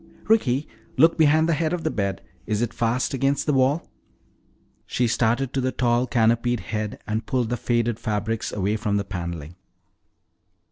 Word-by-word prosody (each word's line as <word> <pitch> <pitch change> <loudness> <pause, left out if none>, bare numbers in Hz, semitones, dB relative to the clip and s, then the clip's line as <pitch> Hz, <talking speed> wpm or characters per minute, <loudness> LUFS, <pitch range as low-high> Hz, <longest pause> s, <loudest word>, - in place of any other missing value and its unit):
"Ricky, 145 - +2 0.3
look 165 +5 +6
behind 155 0 +4
the 170 - +2
head 155 +1 0
of 175 -2 -2
the 155 - 0
bed! 100 -2 -2 0.2
Is 110 +1 0
it 120 - -2
fast 120 +3 0
against 135 +1 +1
the 150 - +1
wall?" 135 +4 +2 1.0
She 125 - +1
started 120 +3 +1
to 135 - 0
the 130 0 0
tall 120 0 +1
canopied 115 0 +2
head 105 -1 -4
and 110 +1 -3
pulled 125 -3 0
the 120 - 0
faded 120 -1 0
fabrics 110 0 -2
away 105 +2 -1
from 105 -2 0
the 100 - -2
paneling. 85 -5 -5
120 Hz, 170 wpm, -24 LUFS, 110-135 Hz, 1.0 s, look